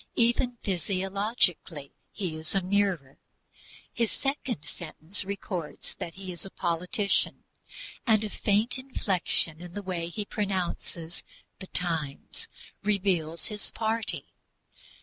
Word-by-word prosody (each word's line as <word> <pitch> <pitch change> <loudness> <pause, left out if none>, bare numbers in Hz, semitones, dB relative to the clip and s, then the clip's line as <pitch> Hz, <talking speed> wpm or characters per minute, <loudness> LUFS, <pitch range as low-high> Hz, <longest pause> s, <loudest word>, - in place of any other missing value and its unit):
Even 240 +1 +3
physiologically 190 - 0 0.2
he 185 -6 -2
is 160 +4 -2
a 195 - +5
mirror. 185 -8 +1 0.7
His 230 -2 +2
second 270 - -2
sentence 170 +5 -2
records 190 -4 -4
that 165 - -4
he 190 -1 -5
is 175 - -7
a 195 - -5
politician, 185 +5 +1 0.6
and 220 -2 +6
a 215 - -1
faint 215 +5 +2
inflection 185 - +3
in 175 -1 -8
the 205 - -4
way 175 -3 -2
he 210 +4 -2
pronounces 185 -4 -2 0.4
The 190 - -7
Times 160 -7 -1 0.3
reveals 180 -6 +1
his 210 -1 -1
party. 225 0 -1
190 Hz, 115 wpm, -29 LUFS, 170-210 Hz, 0.7 s, and